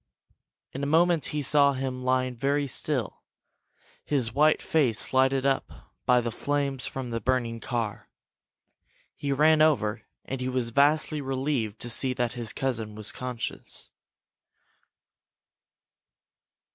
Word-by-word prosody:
In 135 - -6
a 140 - -1
moment 165 0 +3
he 150 -1 -2
saw 140 0 +4
him 130 -1 -4
lying 130 0 +1
very 140 +4 0
still, 130 -4 -2 0.8
his 125 -6 -1
white 155 +2 +4
face 130 -9 +1
lighted 130 0 +3
up 135 - -2
by 125 0 +5
the 120 -1 -3
flames 140 +1 -1
from 130 -2 -5
the 115 0 -2
burning 120 -3 0
car. 115 -4 -4 1.1
He 140 - -3
ran 155 +3 +4
over 115 -9 +2 0.2
and 135 -1 -4
he 130 - -1
was 125 -2 -1
vastly 150 +3 +3
relieved 130 -5 -2
to 120 - -2
see 130 +2 +2
that 120 -1 -1
his 120 -3 -4
cousin 115 -5 -2
was 105 -1 -3
conscious. 125 -2 -6
130 Hz, 130 wpm, -27 LUFS, 120-145 Hz, 1.1 s, by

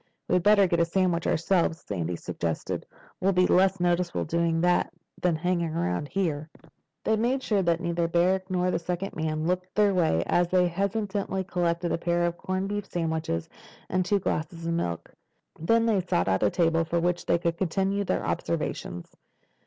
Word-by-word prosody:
"We'd 180 - +2
better 205 +1 +5
get 170 -2 +1
a 170 - +4
sandwich 175 -1 0
ourselves," 170 -1 +1
Sandy 90 -3 -3
suggested. 85 -1 -4 0.3
"We'll 195 +1 +2
be 180 0 +4
less 190 +1 +3
noticeable 175 0 0
doing 165 0 +1
that 175 0 +2 0.3
than 175 -2 +2
hanging 170 -1 -1
around 90 - -1
here." 155 -4 -2 0.5
They 220 - +2
made 250 +5 0
sure 210 -5 +1
that 170 -2 +1
neither 170 -1 0
Barrack 185 +3 +1
nor 180 0 +1
the - - 0
second 180 +3 -4
man 155 0 -2
looked 180 +1 -2
their 205 -1 +4
way 160 - +2
as 175 0 +2
they 180 0 +3
hastily 195 +1 -2
collected 175 -2 -1
a - - 0
pair 175 0 +1
of 170 0 -1
corned 185 +2 -3
beef 205 -1 -3
sandwiches 160 - -2 0.4
and 185 0 +1
two 205 +3 +2
glasses 165 -2 -3
of 170 - 0
milk. 85 - -3 0.5
Then 230 +8 +3
they 215 -4 +2
sought 130 - 0
out 95 - +1
a 105 - +4
table 165 - +2
from 170 +1 -1
which 175 0 -1
they 170 - +4
could 170 -1 -2
continue 195 +3 0
their - - -1
observations. 85 0 -3
175 Hz, 180 wpm, -27 LUFS, 165-190 Hz, 0.5 s, better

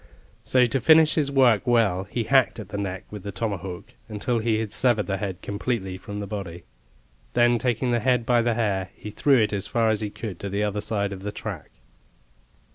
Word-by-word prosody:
So 130 -1 +3
to 120 +2 -1
finish 160 +3 +6
his 145 -3 0
work 125 -7 +4
well, 105 -6 +2
he 115 +4 -3
hacked 130 +3 +3
at 105 -2 -8
the 100 - -5
neck 95 -2 -4
with 105 -1 -7
the 100 +2 -6
tomahawk 95 -3 -5 0.2
until 115 +3 -1
he 110 -1 +1
had 110 -1 -3
severed 120 -3 +2
the 95 -1 -2
head 95 -3 -5
completely 100 -2 -3
from 100 +2 -7
the 100 - -4
body; 95 -4 -6 0.7
then 120 0 +4
taking 125 0 0
the 120 - +2
head 125 0 +1
by 120 0 +3
the 115 -1 +1
hair, 100 -5 -1
he 105 - -8
threw 140 +5 +3
it 105 -1 +1
as 100 -2 -2
far 115 -1 +2
as 110 0 -1
he 105 - -2
could 100 -4 -7
to 100 - -5
the 100 +2 -1
other 105 0 -1
side 100 -2 -2
of 95 - -8
the 105 +1 -4
track. 105 -6 -7
105 Hz, 215 wpm, -25 LUFS, 100-120 Hz, 0.7 s, finish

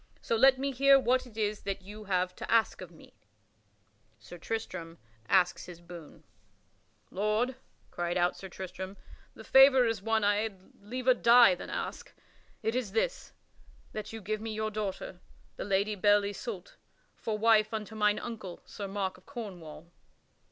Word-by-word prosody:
So - - -1
let 265 +3 +6
me 275 +1 -1
hear 275 +1 +6
what 255 0 +1
it 220 -3 -16
is 210 -1 -1
that 195 -1 -4
you 210 +2 -10
have 180 -1 0
to - - -6
ask 225 -3 +2
of 185 - -8
me." 165 - -17 1.0
[Sidenote: - - -29
Sir 175 - -10
Tristram 185 -5 -5 0.3
asks 180 -2 +3
his 175 -2 -10
boon] 170 -2 -12 0.9
"Lord," 215 +6 0 0.4
cried 175 0 -2
out 175 0 +2
Sir 190 - -9
Tristram, 190 +1 -7 0.4
"the - - -11
favor 265 -1 +7
is 225 -4 -1
one 220 +1 +1
I 205 0 +3
had 205 -3 -5
liever 255 +5 +1
die 235 -4 +6
than 180 - -7
ask. - - -5 0.5
It 225 - 0
is 240 -6 -2
this: - - -1 0.6
that 215 -1 -6
you 225 0 -7
give 215 +2 -3
me 220 0 -4
your 215 0 -2
daughter, 195 -3 -4 0.4
the - - -5
Lady 200 +2 +1
Belle 205 +1 +4
Isoult, 470 - -6 0.4
for 220 -2 -3
wife 215 0 +4
unto 220 -1 -5
mine 210 -1 +2
uncle, 215 -7 -7
King 200 -1 -5
Mark 195 -2 -2
of 185 - -30
Cornwall." 175 - -9
210 Hz, 165 wpm, -30 LUFS, 190-230 Hz, 1.0 s, favor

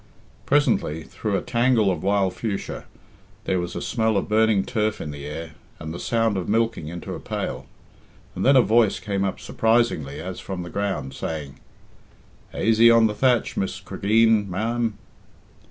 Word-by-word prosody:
Presently, 115 - +2
through 105 +3 -3
a 90 - -4
tangle 120 -4 +2
of 85 -4 -3
wild 100 -1 +1
fuchsia, 105 -4 -4 0.6
there 95 - 0
was 90 0 -4
a - - -4
smell 110 -3 +1
of 100 - -1
burning 110 -2 +3
turf 110 0 -1
in 75 - -5
the 70 0 -7
air 80 +2 -6 0.3
and 80 0 -6
the 85 - -6
sound 115 -3 +1
of 90 - -3
milking 115 -6 0
into 85 +2 -6
a - - -6
pail, - - -4 0.7
and - - -4
then 135 +2 +5
a 130 - +7
voice 110 +1 +3
came 100 -2 -2
up 95 - -2
surprisingly 110 -12 0
as 90 +2 -6
from 95 -2 -5
the 85 - -9
ground, 95 -9 -2
saying: 75 -4 -5 0.9
"Aisy 115 +2 +4
on 115 -1 +6
the 105 - +1
thatch, 125 0 +1
Miss 95 0 -2
Cregeen, 105 +2 +2
ma'am." 115 +3 -1
100 Hz, 170 wpm, -23 LUFS, 90-115 Hz, 0.9 s, a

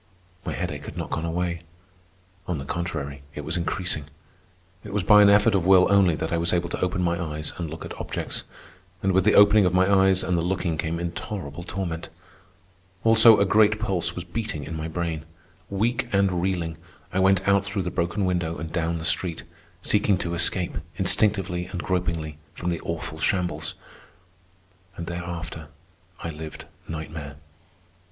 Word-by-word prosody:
My - - -3
headache - - -4
had - - -8
not - - -4
gone 80 - -2
away. 85 0 -2 0.9
On 90 - -1
the 70 - -6
contrary, 70 -5 -4
it 75 - -4
was 80 - 0
increasing. 85 -3 -2 0.8
It 105 -1 -7
was 105 - +1
by 105 +3 +7
an 100 - +7
effort 105 +2 +5
of 95 -3 +2
will 95 0 +6
only 95 -5 +5
that 80 +2 -3
I 85 - +1
was 85 +1 +1
able 85 -1 0
to - - -4
open 90 0 0
my 85 0 0
eyes 75 -1 -3
and 85 -3 -4
look 80 +1 -7
at - - -7
objects. - - -3 0.6
And 95 - +3
with 95 0 +3
the 105 - +5
opening 105 -1 +7
of 90 - 0
my 95 0 +4
eyes 95 -1 +4
and 90 - 0
the 85 - +1
looking 90 -1 -1
came 80 +1 -2
intolerable 85 -2 -5
torment. 85 -2 -4 0.9
Also, 115 -1 +7
a 100 - +4
great 105 +1 +4
pulse 95 -5 -1
was 90 - -4
beating 90 -4 -4
in 80 - -6
my 80 0 -3
brain. 80 -1 -3 0.5
Weak 120 +5 0
and 100 -3 +2
reeling, 85 -3 -1 0.4
I 95 - +1
went 95 0 +3
out 100 0 +4
through 100 -1 -2
the 90 - -3
broken 85 +4 -1
window 85 -3 -1
and 80 +2 -6
down 85 -1 0
the 80 - -5
street, 85 0 +1 0.4
seeking 105 -2 +2
to 85 -1 -3
escape, 85 +1 +1 0.2
instinctively 95 -4 +1
and 90 -1 -5
gropingly, 85 -4 -2 0.2
from 90 0 -2
the 85 - -3
awful 80 -2 -5
shambles. 85 -5 -1 1.2
And 85 - -5
thereafter 85 -2 -6 0.6
I 85 - -3
lived 80 0 -8 0.2
nightmare. 80 -2 -6
90 Hz, 175 wpm, -25 LUFS, 80-95 Hz, 1.2 s, by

